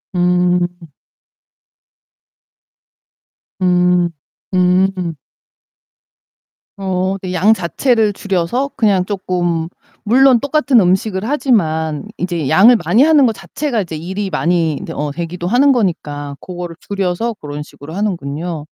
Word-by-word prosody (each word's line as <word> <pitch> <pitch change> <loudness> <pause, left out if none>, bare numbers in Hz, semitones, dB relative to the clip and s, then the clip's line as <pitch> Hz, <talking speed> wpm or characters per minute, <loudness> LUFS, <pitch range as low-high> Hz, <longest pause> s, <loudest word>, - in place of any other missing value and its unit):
음. 180 0 +2 2.9
음. 180 -1 +3 0.4
음음. 180 -1 +1 1.6
어어 190 0 -1
네. 185 -1 -5
양 200 +5 +4
자체를 220 +3 +1
줄여서 200 +9 -1
그냥 200 -5 +2
쪼끔 175 -4 -2 0.4
물론 255 +3 +5
똑같은 285 -1 +2
음식을 190 +1 +1
하지만 165 - 0
인제 170 -6 -2
양을 215 +9 +6
많이 240 +5 +4
하는 300 -3 +5
것 225 - 0
자체가 250 -1 -3
일이 190 +6 -4
많이 165 0 +1
인제 - - -6
어 150 0 -3
되기도 170 +3 -5
하는 255 +8 +4
거니까 145 - -2
고거를 175 -2 -7
줄여서 200 +3 -2
고런 145 -7 -7
식으로 150 +1 -12
하는군요. 170 -5 -3
180 Hz, 230 characters per minute, -16 LUFS, 170-215 Hz, 2.9 s, 양을